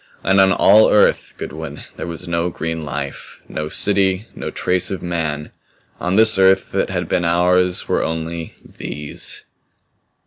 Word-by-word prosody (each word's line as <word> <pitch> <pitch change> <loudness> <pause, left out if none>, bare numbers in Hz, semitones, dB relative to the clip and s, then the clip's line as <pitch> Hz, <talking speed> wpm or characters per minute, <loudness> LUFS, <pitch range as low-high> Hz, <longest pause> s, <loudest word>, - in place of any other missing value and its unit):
And 95 0 +4
on 95 0 +5
all 105 +3 +6
Earth, 105 - +2
Goodwin, - - -7
there - - -6
was 85 +1 -6
no 85 +1 -1
green 80 -1 -4
life, 70 -2 -6
no 75 0 -4
city, 95 +1 +1
no - - -5
trace 90 0 0
of 95 - -5
man. 80 -4 -3 0.5
On 90 +2 -1
this 110 -1 +6
Earth 95 0 +4
that - - -1
had - - -3
been 90 - 0
ours 90 +1 +2
were - - 0
only 80 0 -4
These. 75 0 -6
90 Hz, 150 wpm, -19 LUFS, 80-95 Hz, 0.5 s, all